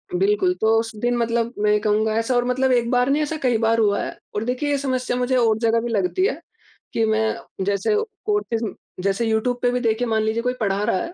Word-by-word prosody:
बिल्कुल, 390 -1 +2
तो 220 +1 +4
उस 225 -1 -4
दिन 240 +3 0
मतलब 235 0 0
मैं 210 0 +2
ये 210 - +3
कहूँगा, 215 +1 +1
ऐसा 230 +3 0
और 245 0 +2
मतलब 260 +1 +1
एक 235 -1 +1
बार 250 +1 +2
नहीं, 290 +2 +2
ऐसा 310 +1 -3
कई 245 -3 +3
बार 230 0 +2
हुआ 205 -2 +2
है। - - -6 0.2
और 210 - -1
देखिए, 255 +4 -1
ये 285 - +2
समस्या 255 -2 -1
मुझे 250 +1 0
और 225 -3 +3
जगह 230 0 +2
भी 240 - -3
लगती 210 - +1
है - - -3 0.5
कि 225 - +2
मैं 220 0 +1 0.3
जैसे 200 - +1 0.3
कोर्सेस 415 - -1 0.4
जैसे 195 +4 0
यूट्यूब 225 +3 0
पे 245 - +2
भी, 250 - 0
देखिए, 230 +1 0
मान 220 -1 +1
लीजिए 220 +2 -1
कोई 250 0 0
पढ़ा 200 -1 0
रहा 200 - +1
है। 340 - -7
235 Hz, 235 wpm, -22 LUFS, 220-250 Hz, 0.5 s, तो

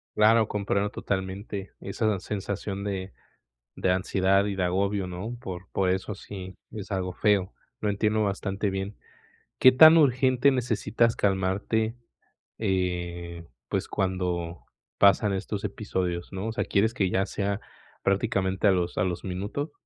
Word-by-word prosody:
Claro, 110 +1 +5
comprendo 100 0 0
totalmente 95 +1 -4
esa 100 0 -1
sensación 100 0 -4
de 95 -1 -4 0.6
de 90 - +2
ansiedad 95 +1 +2
y 100 -1 -2
de 90 - 0
agobio, 100 +2 0
¿no?, 95 +7 -5
por 95 -4 -7
por 95 -1 +1
eso 95 +2 -1
sí, 95 -1 -9 0.2
es 105 -1 -7
algo 95 -2 -2
feo, 100 -2 +2 0.3
lo 105 - 0
entiendo 105 +1 +1
bastante 100 +1 -1
bien, 95 +1 -3 0.6
¿qué 130 - +8
tan 160 +5 +9
urgente 130 -1 +4
necesitas 120 -2 +1
calmarte?, 100 +4 0 0.6
eh, 85 -4 -2 0.2
pues, - - -2
cuando 90 -2 -2 0.3
pasan 100 +1 +5
estos 100 +2 -4
episodios, 95 -4 -3
¿no?, 95 +3 -4
o - - -2
sea, 120 - -1
¿quieres 110 +4 +1
que 95 -7 +1
ya 95 +1 +1
sea 100 +1 -2 0.4
prácticamente 95 0 +1
a - - +7
los 90 -2 0
a - - +2
los 90 -2 -3
minutos? 100 - -4
100 Hz, 140 wpm, -27 LUFS, 95-105 Hz, 0.6 s, tan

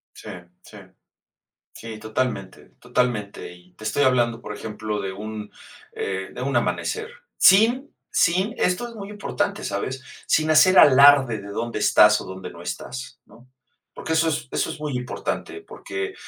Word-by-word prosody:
Sí, - - -12 0.3
sí. - - -14 0.9
Sí, 110 -1 -9
totalmente, 110 -3 -4
totalmente. 105 -7 -2
Y 90 +1 -19
te - - -17
estoy 145 +6 +1
hablando, 120 -2 +2
por 105 - -7
ejemplo, 105 -1 -5
de 95 - -4
un, 105 +1 -7 0.4
eh, 95 -1 -4
de - - -8
un 135 -1 -1
amanecer. 440 - -1 0.3
Sin 235 +9 +5 0.2
sin, 185 +6 +2
esto 180 +7 0
es 235 - -11
muy 200 -2 -8
importante, 205 0 -3
¿sabes?, 115 +7 -3 0.3
sin 155 0 +2
hacer 170 +4 +6
alarde 135 -4 +7
de 100 - -10
dónde 115 +2 -4
estás 105 0 +5
o - - -8
dónde 95 -1 -8
no 85 - -12
estás, 125 +8 -7
¿no? 125 +2 -20 0.4
Porque - - -5
eso 160 0 +2
es 155 -4 -2
eso - - -1
es - - -7
muy 150 -4 -3
importante, 125 - -5
porque 395 -1 -6
125 Hz, 160 wpm, -23 LUFS, 105-165 Hz, 0.9 s, alarde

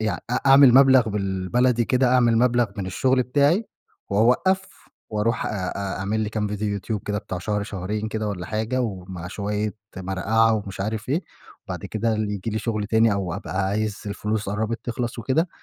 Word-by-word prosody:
يع 110 -2 -1
أ - - -1
أعمل 135 -2 +8
مبلغ 130 -3 +6
بالبلدي 105 +5 +1
كده 125 0 +2
أعمل 120 -2 +4
مبلغ 120 0 +3
من 95 -2 -3
الشغل 130 +7 +2
بتاعي، 145 - +2 0.4
واوقّف، 125 - +1 0.2
واروح 110 +2 0
أ - - -1
أ 95 0 -3
أعمل 100 +3 -1
لي 105 - -1
كام 105 -1 -2
ڤيديو 105 0 -5
يوتيوب 100 0 -2
كده 105 0 -1
بتاع 95 -3 -5
شهر 105 +3 -2
شهرين 105 +2 -4
كده 110 -1 -2
والّا 90 -3 -4
حاجة، 110 +5 -1
ومع 95 -5 -5
شويّة 105 +2 -3 0.2
مرقعة 100 +5 +2
ومش 100 -3 -5
عارف 110 +3 -3
إيه، 155 +7 0 0.4
وبعد - - -6
كده 110 +1 -1
ال 110 -1 -1
ييجي 105 +2 -3
لي 110 - -1
شغل 110 -2 -2
تاني، 110 0 +3
أو 95 -4 -2
أبقى 95 -1 -2
عايز 105 +1 -1
الفلوس 105 +1 -2
قرّبت 110 +3 -2
تخلص 120 0 -3
وكده، 135 - +1
110 Hz, 180 wpm, -23 LUFS, 100-120 Hz, 0.4 s, أعمل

